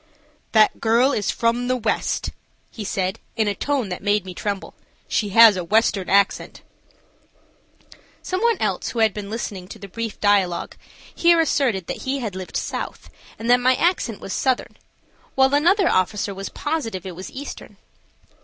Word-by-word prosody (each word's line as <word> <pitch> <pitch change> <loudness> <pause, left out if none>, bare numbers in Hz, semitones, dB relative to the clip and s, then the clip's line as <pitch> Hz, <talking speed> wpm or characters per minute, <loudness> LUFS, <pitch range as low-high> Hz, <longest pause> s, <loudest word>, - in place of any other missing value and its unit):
"That 215 -1 +4
girl 235 +4 +3
is 210 -7 -1
from 235 +1 0
the 255 0 +1
west," 225 -2 -1 0.4
he 220 - -7
said, 190 +1 -2 0.2
in 220 -2 +1
a 205 - +1
tone 265 0 -1
that 180 - -5
made 205 -1 +1
me 185 - -7
tremble. 200 +2 -4 0.3
"She 210 - 0
has 225 +1 +8
a 180 - -3
western 205 0 +1
accent." 200 0 +1 1.6
Some 370 +1 -2
one 465 -2 +3
else - - -1
who - - -7
had 220 -2 +3
been 205 -1 -6
listening 205 -4 -5
to 210 - -10
the 200 -2 -10
brief 225 +2 -5
dialogue 195 -4 +1 0.4
here 340 -1 +4
asserted 255 - +1
that - - -4
he 265 +1 -2
had 220 -8 -4
lived 185 -1 -5
south - - -5 0.3
and 225 - -6
that 245 - +6
my 255 +1 +3
accent 275 - 0
was 195 - -5
southern, 260 -2 -1 0.6
while 265 +1 +4
another 350 +6 +4
officer 200 +2 0
was 195 0 -6
positive 230 - -3
it 185 -2 -6
was 185 +2 -8
eastern. 280 +2 -9
220 Hz, 170 wpm, -22 LUFS, 195-260 Hz, 1.6 s, has